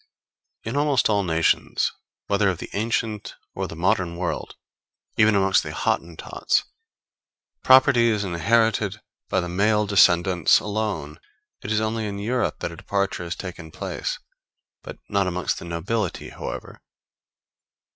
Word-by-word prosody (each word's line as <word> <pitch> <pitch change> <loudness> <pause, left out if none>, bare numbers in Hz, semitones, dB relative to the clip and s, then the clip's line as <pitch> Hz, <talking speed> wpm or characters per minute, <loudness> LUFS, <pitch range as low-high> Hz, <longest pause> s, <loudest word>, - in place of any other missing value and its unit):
In 115 +4 -4
almost 145 -5 +2
all 100 -1 +2
nations, 80 -2 +1 0.3
whether 100 0 +2
of 90 - -2
the - - -8
ancient 110 0 -2 0.2
or - - -3
the - - -8
modern 85 0 0
world, 90 -1 -3 0.6
even 105 -1 +4
amongst 95 -1 +3
the - - -6
Hottentots, 85 -1 -1 1.0
property 130 -2 +6
is 105 -3 +1
inherited 105 +3 +1 0.3
by 95 - +2
the 90 - -4
male 105 +4 +2
descendants 90 -3 +4
alone; 100 -8 -3 0.4
it 105 - -4
is 110 - +2
only 110 0 -1
in 100 -1 -5
Europe 120 +5 -1
that - - -2
a - - -9
departure 100 -2 -2
has 85 - -4
taken 90 -4 -8
place; - - -4 0.6
but - - -9
not 100 -2 +1
amongst 90 -2 -1
the - - -9
nobility, 90 +4 -3
however. - - -7
100 Hz, 135 wpm, -24 LUFS, 85-110 Hz, 1.0 s, property